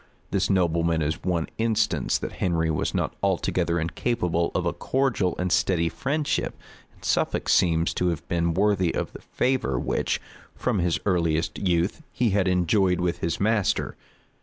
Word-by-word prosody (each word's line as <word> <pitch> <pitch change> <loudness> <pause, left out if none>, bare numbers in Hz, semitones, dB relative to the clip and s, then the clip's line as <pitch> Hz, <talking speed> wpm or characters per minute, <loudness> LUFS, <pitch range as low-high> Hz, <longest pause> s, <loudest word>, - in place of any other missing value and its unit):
This - - +1
nobleman 85 -3 +2
is 75 +2 -2
one 85 -3 0
instance 110 -1 +1
that - - -5
Henry 80 -3 +1
was 75 - -1
not - - -1
altogether 90 -3 +1
incapable 85 -1 0
of 90 - 0
a 85 - 0
cordial 120 -6 0
and 90 0 -1
steady 85 -2 +2
friendship; 145 - -1 0.4
and - - -14
Suffolk - - 0
seems 85 -1 +3
to 90 - 0
have 85 -4 -2
been 85 -2 0
worthy 95 -3 +2
of - - -3
the - - -10
favor 125 - 0
which, - - -1 0.4
from 100 - 0
his 85 -1 +1
earliest 85 -4 0
youth, 90 - 0
he 120 -3 +1
had 100 -1 +2
enjoyed 90 0 +2
with 90 -1 -1
his 85 0 -2
master. 105 -1 +1
90 Hz, 160 wpm, -25 LUFS, 85-100 Hz, 0.4 s, seems